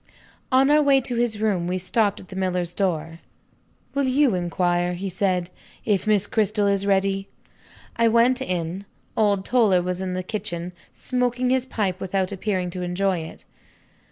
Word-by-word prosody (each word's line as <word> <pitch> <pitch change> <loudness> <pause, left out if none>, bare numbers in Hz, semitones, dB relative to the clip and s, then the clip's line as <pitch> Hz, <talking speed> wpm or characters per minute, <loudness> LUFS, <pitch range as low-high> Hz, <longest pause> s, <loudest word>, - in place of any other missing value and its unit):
On 265 +2 +4
our 300 0 +5
way 280 -2 +5
to 250 -1 -3
his 235 -3 0
room 195 -5 0
we 180 +1 -1
stopped 200 +3 0
at 185 - -14
the 190 - -9
miller's 180 -2 -1
door. 165 -4 -2 0.7
"Will 280 -1 +1
you 265 -2 +3
inquire," 175 0 0
he 190 +2 -4
said, 180 -2 0 0.3
"if 205 -3 +1
Miss 205 -2 +3
Cristel 210 -1 +1
is 200 0 +1
ready?" 195 0 +1 0.7
I 230 0 +4
went 235 +3 +3
in. 180 +2 -3 0.3
Old 205 -3 +2
Toller 215 -8 +3
was 180 +1 -3
in 185 -1 -3
the 185 0 -3
kitchen, 180 -3 -5 0.2
smoking 250 0 -1
his 260 0 +1
pipe 195 -7 -2
without 190 0 -1
appearing 190 -2 -2
to 180 0 -5
enjoy 180 +1 0
it. 160 0 -9
195 Hz, 165 wpm, -23 LUFS, 180-225 Hz, 0.7 s, our